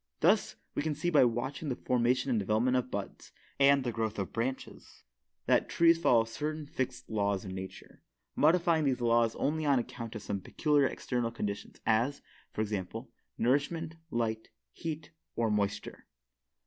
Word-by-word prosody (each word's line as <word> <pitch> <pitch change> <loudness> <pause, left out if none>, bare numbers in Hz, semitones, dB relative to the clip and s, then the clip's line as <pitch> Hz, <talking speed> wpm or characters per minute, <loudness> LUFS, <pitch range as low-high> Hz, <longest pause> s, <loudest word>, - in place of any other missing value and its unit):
Thus, - - +3 0.2
we - - -1
can 150 0 -1
see 175 +4 -1
by 145 -5 +6
watching 130 +6 -2
the 125 - -1
formation 125 +2 +1
and 115 - +2
development 110 +6 +2
of 125 0 0
buds, 100 -3 -6 0.3
and 140 0 +5
the 120 - -1
growth 110 -1 -2
of 100 -2 -3
branches, 130 +3 -5 0.4
that - - +3
trees 165 0 +5
follow 120 -8 +4
certain 150 +7 -4
fixed 130 -2 -4
laws 100 -3 0
of 95 - -6
nature, 95 0 -8 0.3
modifying 165 0 +3
these 130 -2 +1
laws 115 -1 +3
only 155 +2 0
on 140 -2 +4
account 115 -1 -5
of 110 - -6
some 100 -1 -3
peculiar 145 - +2
external 120 -3 -2
conditions 105 -3 -5
as, 120 +6 +1 0.3
for - - -3
example, 110 +3 -4 0.3
nourishment, 145 +6 +1 0.2
light, 110 -4 -2 0.2
heat 155 -2 -5 0.2
or 115 -2 +1
moisture. 100 -1 -2
125 Hz, 160 wpm, -31 LUFS, 110-145 Hz, 0.4 s, by